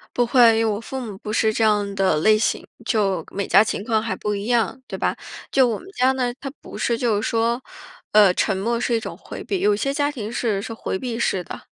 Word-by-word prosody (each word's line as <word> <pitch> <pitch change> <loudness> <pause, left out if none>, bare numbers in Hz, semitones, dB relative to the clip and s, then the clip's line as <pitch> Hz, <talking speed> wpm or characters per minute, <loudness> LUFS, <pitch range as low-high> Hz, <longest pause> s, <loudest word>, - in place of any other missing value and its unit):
不 245 -1 +2
会， 230 -2 +5
因 - - +2
为 215 - +1
我 205 - -2
父 265 +4 -6
母 215 -5 -7
不 215 +2 -6
是 220 -1 +2
这 225 - 0
样 205 -2 +1
的 190 -5 +2
类 215 +7 +4
型， 215 - 0 0.2
就 195 -7 0
每 200 0 -3
家 200 - +6
情 205 -2 -3
况 220 -2 +1
还 225 0 -3
不 210 -1 -2
一 200 +1 -4
样， 240 0 +1
对 - - -6
吧？ - - 0 0.4
就 265 -2 +4
我 225 -3 -2
们 375 - -13
家 255 +1 +4
呢， 250 -2 -1
它 275 - -6
不 - - -10
是 235 - 0
就 230 -3 +1
是 - - -2
说， 230 +2 +1 0.5
呃， 210 -3 +6
沉 195 - +1
默 230 +5 -1
是 240 - -1
一 230 - +2
种 - - -7
回 - - -9
避。 390 - -2
有 210 0 +3
些 275 +7 -1
家 285 +1 0
庭 225 -5 -6
是 215 -5 -1
是 225 - -6
回 205 -4 -4
避 240 -3 -4
式 195 -5 0
的， - - -8
225 Hz, 275 characters per minute, -22 LUFS, 205-240 Hz, 0.5 s, 家